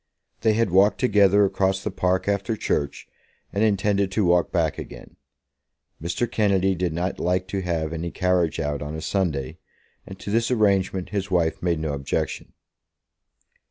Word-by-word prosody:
They 110 - +2
had 115 -3 +1
walked 100 +3 +4
together 100 -4 +4
across 95 0 0
the 105 - -2
park 95 +1 0
after 100 +2 0
church, 70 -8 -2 0.5
and 100 - +1
intended 100 -2 +1
to 105 -1 +1
walk 85 -1 +3
back - - 0
again. - - -10 0.9
Mr. 85 +8 -1
Kennedy 100 -4 +1
did 90 -1 -1
not 85 +3 -3
like 90 +1 0
to 95 - -2
have 80 -3 -2
any 85 +1 -3
carriage 90 -3 0
out 75 -2 -2
on 75 +1 -5
a 80 - -5
Sunday, 80 -9 -2 0.5
and 95 - -9
to 100 - -6
this 115 +2 +1
arrangement 100 -5 +1
his 100 -2 -3
wife 85 -3 +1
made 85 -2 +1
no 80 -2 -2
objection. 70 -1 -3
95 Hz, 160 wpm, -24 LUFS, 85-100 Hz, 0.9 s, walked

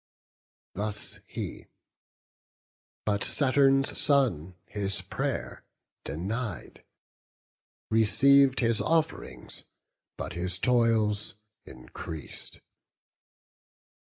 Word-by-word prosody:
Thus 105 0 -3
he; - - -6 1.4
but 100 -1 0
Saturn's 135 -1 +3
son 110 - +2
his 100 -2 -1
pray'r - - -3 0.4
denied; 100 - -4 1.1
Receiv'd 135 +5 +5
his 115 -2 +2
off'rings, 160 - -2 0.5
but - - -5
his 90 +1 -2
toils 110 -3 +2 0.3
increas'd. 65 +4 -9
110 Hz, 65 wpm, -28 LUFS, 95-135 Hz, 1.4 s, Receiv'd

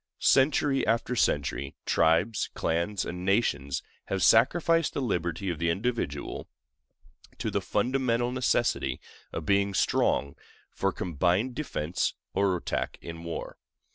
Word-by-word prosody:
Century 135 0 +3
after 115 +2 +1
century, 70 - 0
tribes, 85 +7 +2
clans, 85 +5 -1
and 90 +1 -5
nations 90 - 0 0.2
have 95 -2 -1
sacrificed 165 +7 +4
the - - 0
liberty 90 - -1
of 85 - -5
the 85 0 +1
individual 95 - -2 0.9
to - - -2
the - - 0
fundamental 125 -2 0
necessity 120 - 0 0.3
of - - -5
being 100 -1 +2
strong 70 -6 +1 0.4
for 95 - 0
combined 90 - 0
defense 90 - -2 0.2
or 95 -2 +2
attack - - -3
in 85 0 -7
war. 85 -1 -6
95 Hz, 120 wpm, -28 LUFS, 85-120 Hz, 0.9 s, sacrificed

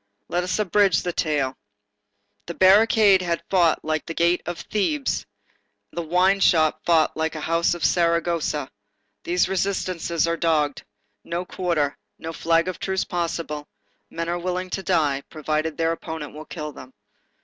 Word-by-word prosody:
Let 175 +1 0
us 185 - -1
abridge 200 -3 +3
the 175 - -2
tale. 140 -5 -1 0.9
The 170 - -5
barricade 200 0 +5
had 170 -2 -2
fought 175 -5 +3
like 155 +1 -2
a 165 - -4
gate 170 +1 +2
of 175 -1 -4
Thebes; 270 +8 -1 0.6
the 170 - -3
wine 180 +4 +2
shop 155 -4 +3
fought 165 -2 +3
like 160 0 -2
a 155 - -5
house 165 +2 +1
of 175 - -2
Saragossa. 170 -4 +1 0.5
These 180 +1 +2
resistances 185 -4 -1
are 170 0 0
dogged. 155 -4 +1 0.4
No 170 +2 -3
quarter. 170 -7 -1 0.2
No 165 +1 -6
flag 165 +1 +1
of 185 - -4
truce 190 -1 -1
possible. 165 -4 -3 0.4
Men 165 0 -4
are 175 +1 -1
willing 180 +1 -3
to 195 - -2
die, 150 -7 +1
provided 155 0 -2
their 165 0 +1
opponent 160 -2 -6
will 155 +1 -9
kill 150 -1 -6
them. 130 -2 -12
170 Hz, 155 wpm, -23 LUFS, 155-180 Hz, 0.9 s, barricade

